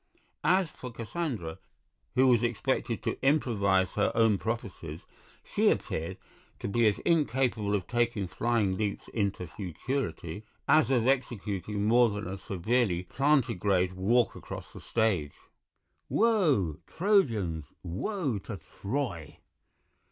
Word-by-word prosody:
As 185 -3 +3
for 125 - -8
Cassandra, 115 - -4 0.6
who 130 - +5
was 120 -3 +5
expected 120 -1 -1
to - - -3
improvise 100 -10 +2
her 105 - +1
own 115 -3 +4
prophecies, 95 -8 -4 0.4
she - - +2
appeared 85 +4 -2 0.4
to - - -5
be 115 +3 +3
as 105 - +2
incapable 130 -10 +2
of 95 -3 -2
taking 120 -5 0
flying 110 -2 +1
leaps 105 -2 -2
into 100 -4 -1
futurity 90 - -4 0.2
as 155 -6 +5
of 125 -4 +2
executing 105 -6 -1
more 120 +2 +5
than 105 0 -4
a 95 +1 -5
severely 95 0 0
plantigrade 105 - +2
walk 110 +6 +2
across - - -8
the - - -10
stage. 95 -11 0 0.8
"Woe! 155 - +3
Trojans, 115 - +1 0.2
woe 125 - -2
to 100 +1 -7
Troy!" 95 - -4
110 Hz, 120 wpm, -29 LUFS, 95-130 Hz, 0.8 s, who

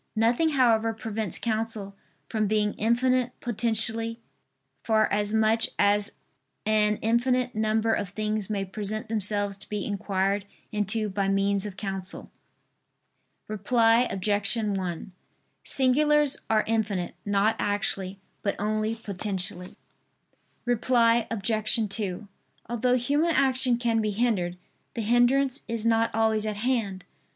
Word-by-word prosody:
Nothing 235 +9 +3
however 230 -4 +3
prevents 220 -3 -3
counsel 220 -3 -2 0.3
from 215 +3 0
being 210 0 +1
infinite 250 +2 +1
potentially, 230 0 0 0.6
for 220 -1 +3
as 205 0 0
much 220 +1 +2
as 205 0 +2 0.5
an 210 -1 +2
infinite 245 +2 +1
number 220 +1 +1
of 200 - -2
things 215 +1 -2
may 200 -2 -1
present 210 +3 -5
themselves 205 -2 0
to - - -11
be 210 -2 -3
inquired 200 0 -1 0.2
into 210 +1 +1
by 195 0 -1
means 195 +1 +1
of 195 -2 -9
counsel. 195 -2 -5 1.2
Reply 225 +3 +3
Obj. 205 +3 0
1: 195 -5 -3 0.5
Singulars 295 +2 +3
are 220 -1 +3
infinite; 210 -5 -1
not 205 +2 +2
actually, 195 -2 -1 0.2
but 200 - -1
only 215 +2 -1
potentially. 190 -4 -5 0.9
Reply 235 -1 +3
Obj. 215 +1 0 0.2
2: 205 -1 -4 0.4
Although 240 +2 +1
human 290 +7 +1
action 260 -2 +2
can 230 -2 +1
be 215 - 0
hindered, 200 -5 0 0.4
the 235 - -2
hindrance 250 +4 +2
is 230 -1 -3
not 230 0 +3
always 220 -1 +2
at 210 - -2
hand. 215 -5 -1
215 Hz, 120 wpm, -26 LUFS, 205-235 Hz, 1.2 s, Nothing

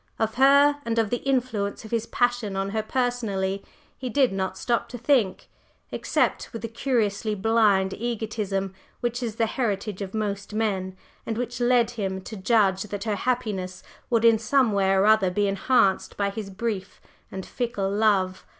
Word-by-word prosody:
Of 220 0 0
her, 280 +3 +5
and 230 0 -2
of 225 -3 +1
the 245 - +1
influence 240 -7 -1
of 220 - -10
his 230 -1 -1
passion 245 -5 0
on 195 0 -1
her 220 +1 0
personally, 215 -6 -1 0.3
he 255 - -5
did 260 0 +3
not 190 -1 -2
stop 235 -1 -1
to 245 - -6
think, 240 -6 +1 0.4
except - - 0
with 230 -2 -7
the - - -1
curiously 220 -3 -1
blind 205 -2 +3
egotism 210 -4 -3 0.3
which 240 +1 -2
is 230 -3 -3
the 230 - +2
heritage 210 -4 -2
of 195 +1 -5
most 205 -1 -3
men, 190 -4 -1 0.3
and 225 - -3
which 245 0 -3
led 240 -1 +3
him 195 -5 -3
to 220 - -8
judge 195 -2 +2
that 205 -1 -5
her 215 -2 -1
happiness 200 -6 -2 0.3
would 230 -2 +2
in 225 -1 +6
some 250 +1 +2
way 195 -1 +2
or 195 +1 +3
other 215 -3 +5
be 205 +3 +1
enhanced 195 0 +2
by 200 -1 0
his 200 -1 -6
brief 200 -1 -4 0.3
and 190 -1 -6
fickle 230 -6 -2
love. 200 -3 +1
215 Hz, 175 wpm, -25 LUFS, 195-235 Hz, 0.4 s, in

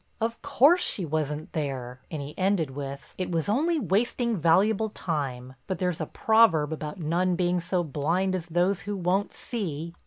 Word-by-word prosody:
"Of 230 +1 -2
course 285 +5 +4
she 185 - 0
wasn't 155 -1 -3
there," 130 -4 -4
and 155 -3 -4
he 145 +2 -8
ended 185 -6 +1
with 140 +1 -7
"it 185 -1 -2
was 165 -2 0
only 310 +10 +2
wasting 235 +1 +1
valuable 195 +6 +3
time, 135 -9 -4
but 185 - -2
there's 180 -2 -1
a 155 - -2
proverb 190 -10 +3
about 150 +1 -6
none 175 +3 +1
being 180 0 +1
so 180 +1 0
blind 170 +6 0
as 175 -2 -3
those 175 +3 +1
who 205 -1 -4
won't 185 +3 0
see." 170 - -3
175 Hz, 175 wpm, -27 LUFS, 150-200 Hz, -, course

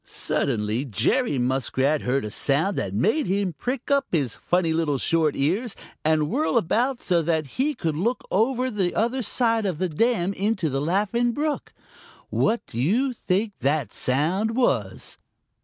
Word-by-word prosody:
Suddenly 110 0 -1
Jerry 145 - +1
Muskrat 130 +3 +1
heard 130 0 0
a 105 - -5
sound 155 - +1
that 95 - -2
made 220 - +1
him 195 -1 0
prick 250 - -4
up 280 -1 +3
his 140 -9 0
funny 175 -2 0
little 160 -4 0
short 160 +1 +1
ears 195 - 0 0.3
and 155 -1 +2
whirl 155 +1 +1
about 245 +8 +1
so 175 -2 +2
that 160 -1 0 0.2
he 295 +2 +1
could 160 -2 -2
look 230 +10 -1
over 250 +5 +1
the 190 -5 -1
other 240 +4 +1
side 225 -1 +1
of 180 -5 -2
the 185 +2 -1
dam 200 +2 +1
into 195 -6 -1
the 135 +1 -1
Laughing 210 +9 +1
Brook. 295 +2 -2 0.6
What 230 +2 +1
do 115 - -4
you 245 - +2
think 205 -1 -1
that 140 -5 0
sound 175 - 0
was? 115 - -1
180 Hz, 160 wpm, -24 LUFS, 145-230 Hz, 0.6 s, up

